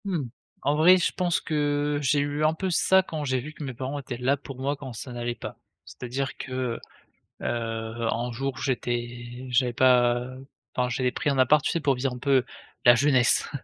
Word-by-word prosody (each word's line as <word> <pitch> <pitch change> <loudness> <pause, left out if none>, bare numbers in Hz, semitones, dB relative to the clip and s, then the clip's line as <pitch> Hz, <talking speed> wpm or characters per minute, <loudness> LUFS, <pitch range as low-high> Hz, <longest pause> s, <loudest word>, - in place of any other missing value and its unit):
Mmh. 165 -10 -2 0.3
En 145 - +2
vrai 175 +5 +7
je 180 - +1
pense 175 -2 +1
que 145 -1 0
j'ai 145 +1 +2
eu 145 +1 -1
un 155 +1 +4
peu 190 +3 -2
ça 190 +2 +4
quand 155 -4 -5
j'ai 130 -2 0
vu 150 +5 -8
que 150 - -8
mes 130 -2 -4
parents 135 +4 -4
étaient 130 -3 -6
là 130 +3 +2
pour 135 -2 -10
moi 140 +2 -1
quand 135 -3 -8
ça 125 +3 -7
n'allait 120 0 -3
pas. - - -8 0.3
C'est-à-dire 130 +2 -5
que, 130 -2 -3 0.6
heu, 115 0 -3
un 120 +1 -2
jour, 135 +3 -3
j'étais 120 -1 -3
j'avais 125 0 +2
pas 120 -1 +4 0.5
enfin 125 0 +1
j'avais 125 +1 0
pris 145 - -1
un 140 - 0
appart, 145 +4 +4
tu - - 0
sais, 170 - 0
pour 140 -2 +2
vivre 125 +1 -1
un - - -6
peu 135 0 +3 0.4
la 120 0 +9
jeunesse. 130 -1 +3
130 Hz, 200 wpm, -26 LUFS, 120-145 Hz, 0.6 s, la